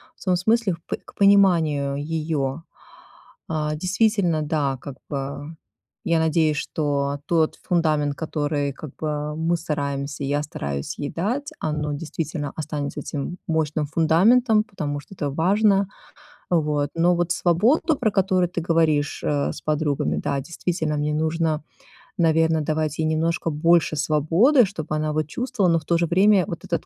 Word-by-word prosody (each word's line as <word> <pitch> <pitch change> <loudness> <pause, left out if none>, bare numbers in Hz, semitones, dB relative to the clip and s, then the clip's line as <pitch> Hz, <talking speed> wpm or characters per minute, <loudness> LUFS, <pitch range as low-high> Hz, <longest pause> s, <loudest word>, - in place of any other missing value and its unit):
в - - -15
том 185 -2 +2
смысле 220 0 +2
в - - -7
пон - - -3
к - - -14
пониманию 170 -9 +4
её. 150 -1 -2 0.9
А, 150 -1 -1
действительно, 185 -1 +1
да, 145 -3 -1
как 140 -3 -8
бы, 140 +3 -5 0.5
я 170 -1 +2
надеюсь, 160 -1 +2
что 145 -2 -1
тот 160 -2 +2
фундамент, 155 -4 +1
который 145 -2 -2
как 150 0 -10
бы 150 -1 -3
мы 165 +2 0
стараемся, 140 -3 -3
я 145 +2 0
стараюсь 70 - -5
ей 145 - -3
дать, 245 - -2
оно 150 -1 -2
действительно 150 -1 -4
останется 150 -2 -4
этим 155 +5 -5
мощным 155 -2 0
фундаментом, 210 - +4
потому 150 -10 -4
что 160 - -15
это 145 -5 -2
важно. 195 +5 +3 0.6
Вот, 150 -4 +1
но 175 +2 +3
вот 175 0 0
свободу, 245 - +2
про 215 - +1
которую 185 -2 +2
ты 180 - -3
говоришь, 160 -3 +1
э, 145 -1 0
с - - -9
подругами, 145 - 0
да, 140 - -1
действительно 160 0 -2
мне 150 +1 -1
нужно, 160 0 0 0.5
наверное, 160 -1 +3
давать 155 0 -1
ей 160 - +1
немножко 160 +1 0
больше 165 +1 +3
свободы, 165 - +4
чтоб 165 -6 -6
она, 155 0 -1
вот, 155 -1 -1
чувствовала, 210 -3 0
но 165 - +3
в 155 - -18
то 170 - +2
же 170 - +1
время 190 +3 +4
вот 170 - -6
этот 170 -3 -2
160 Hz, 155 wpm, -23 LUFS, 150-175 Hz, 0.9 s, пониманию